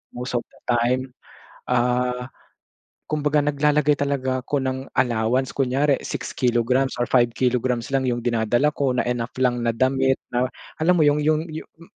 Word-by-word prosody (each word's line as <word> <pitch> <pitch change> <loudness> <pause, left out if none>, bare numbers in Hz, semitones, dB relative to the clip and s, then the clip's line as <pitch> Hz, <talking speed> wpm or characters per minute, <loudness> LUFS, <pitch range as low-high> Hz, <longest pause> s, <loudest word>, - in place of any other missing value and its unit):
most 125 0 -2
of - - -9
the - - -23
time, 125 +2 +1 0.6
ah, 125 +1 0 0.7
kumbaga 150 -1 0
naglalagay 150 0 +2
talaga 130 -2 -1
ako 145 +3 -2
ng 130 0 -3
allowance, 125 +1 +1
kunyari 135 +1 +1
6 - - -5
kilograms 125 +2 +1
or 120 - +1
5 120 -1 +3
kilograms 125 0 0
lang 135 - +3
yung 120 -1 -3
dinadala 120 +5 +1
ko 135 -4 0
na - - +1
enough 120 -1 -3
lang 125 -2 +1
na 120 - +1
damit, 130 +3 +2 0.2
na 125 +1 +1 0.3
alam 180 +2 +4
mo 155 - +4
yung 145 0 +3
yung 155 +1 +1
yu 160 - -5 0.2
m 165 - -15
130 Hz, 165 wpm, -23 LUFS, 120-140 Hz, 0.7 s, alam